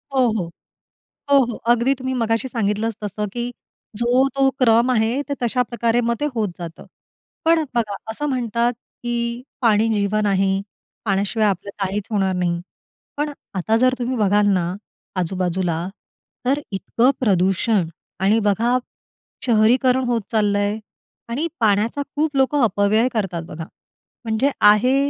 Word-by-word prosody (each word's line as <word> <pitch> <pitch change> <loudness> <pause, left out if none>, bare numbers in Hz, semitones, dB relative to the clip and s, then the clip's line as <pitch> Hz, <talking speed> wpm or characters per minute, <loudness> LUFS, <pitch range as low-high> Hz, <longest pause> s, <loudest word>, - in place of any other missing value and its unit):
हो, 255 -2 +4
हो. 170 -3 -3 0.8
हो, 280 - +7
हो. 235 -1 -5 0.2
अगदी 240 +3 +2
तुम्ही 260 0 -3
मघाशी 225 +3 0
सांगितलंच 220 -1 -1
तसं 210 +1 -3
की 240 0 -3 0.5
जो 245 +3 +3
तो 270 0 +3
क्रम 235 0 +4
आहे, 235 +3 +1
ते 285 0 -4
तशाप्रकारे 235 -1 +1
मग - - +2
ते - - 0
होत 215 -3 +1
जातं. 165 -1 -8 0.6
पण 325 0 +4
बघा 215 -4 0 0.2
असं 295 +7 -3
म्हणतात, 240 -2 0 0.3
की 235 0 -2 0.2
पाणी 225 -2 +3
जीवन 210 0 +1
आहे. 195 0 +2 0.4
पाण्याशिवाय 205 +2 +1
आपलं 195 +1 -2
काहीच 195 +1 -2
होणार 195 -3 +1
नाही. 175 -1 0 0.6
पण 295 0 -1 0.2
आता 220 +4 +1
जर 255 +2 +3
तुम्ही 250 +1 -2
बघाल 205 -1 +3
ना 180 -1 0 0.5
आजूबाजूला, 180 -1 -1 0.6
तर 275 +3 +1
इतकं 230 +6 +2
प्रदूषण 195 -2 +2 0.3
आणि 205 +4 +3
बघा, 225 +4 +2 0.7
शहरीकरण 250 +3 +3
होत 235 -2 +1
चाललंय 205 -1 +1 0.5
आणि 275 +8 -1
पाण्याचा 220 +6 +2
खूप 300 -1 0
लोकं 270 +1 +3
अपव्यय 215 +3 +2
करतात 185 -6 -1
बघा. 160 +1 -7 0.6
म्हणजे 225 +5 +1
आहे 215 +6 +5
225 Hz, 135 wpm, -21 LUFS, 200-245 Hz, 0.8 s, हो